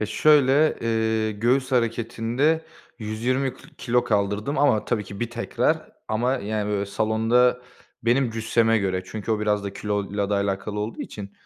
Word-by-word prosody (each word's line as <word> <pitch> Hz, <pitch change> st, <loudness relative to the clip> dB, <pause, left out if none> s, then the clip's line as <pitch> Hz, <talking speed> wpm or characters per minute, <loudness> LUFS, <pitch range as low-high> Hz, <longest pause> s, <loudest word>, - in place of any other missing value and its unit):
Ya, 110 Hz, -, -1 dB
şöyle, 140 Hz, +4 st, +4 dB, 0.3 s
ııı, 110 Hz, -1 st, 0 dB
göğüs 125 Hz, +5 st, 0 dB
hareketinde 120 Hz, +6 st, 0 dB, 0.3 s
120 125 Hz, +4 st, -1 dB
k -, -, -18 dB, 0.2 s
kilo 125 Hz, 0 st, +1 dB
kaldırdım 105 Hz, +4 st, 0 dB
ama 140 Hz, -7 st, +3 dB
tabii 105 Hz, -3 st, -1 dB
ki, 100 Hz, 0 st, -9 dB
bir 120 Hz, -1 st, -2 dB
tekrar 120 Hz, 0 st, -1 dB, 0.2 s
ama 120 Hz, +4 st, +1 dB
yani, 105 Hz, -1 st, -3 dB
böyle, 100 Hz, -1 st, -1 dB
salonda 115 Hz, +4 st, +2 dB, 0.4 s
benim 120 Hz, +2 st, +2 dB
cüsseme 115 Hz, 0 st, +2 dB
göre 95 Hz, -2 st, -1 dB
çünkü 110 Hz, +2 st, -6 dB
o 105 Hz, -, -1 dB
biraz 105 Hz, -1 st, 0 dB
da 100 Hz, -, -4 dB
kiloyla 100 Hz, 0 st, -2 dB
da -, -, +2 dB
alakalı 100 Hz, +1 st, -2 dB
olduğu 110 Hz, +2 st, -4 dB
için, 100 Hz, -1 st, -8 dB
110 Hz, 155 wpm, -24 LUFS, 105-120 Hz, 0.4 s, şöyle